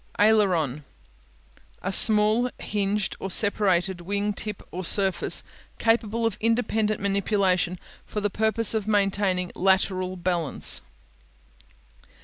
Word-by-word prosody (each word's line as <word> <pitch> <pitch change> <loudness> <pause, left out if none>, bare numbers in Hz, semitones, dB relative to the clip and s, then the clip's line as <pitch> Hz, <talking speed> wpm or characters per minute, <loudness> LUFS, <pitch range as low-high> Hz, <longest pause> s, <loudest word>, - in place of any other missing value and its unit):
Aileron 220 +2 +4
(a'ler 180 - 0
on) 150 -2 -4 1.0
A 195 - -3
small 215 +4 +4
hinged 205 -1 -3
or 195 - -6
separated 190 -3 +1
wing 200 +3 -3
tip 210 0 -5
or 185 +2 -6
surface 190 0 +4 0.3
capable 225 0 -1
of 225 -3 -3
independent 220 -2 -1
manipulation 195 -3 -1 0.3
for 210 - -6
the 205 0 -3
purpose 220 +2 +2
of 215 -2 -3
maintaining 195 -3 -1
lateral 185 -1 -1
balance. 175 -4 +2
200 Hz, 115 wpm, -24 LUFS, 185-215 Hz, 1.0 s, Aileron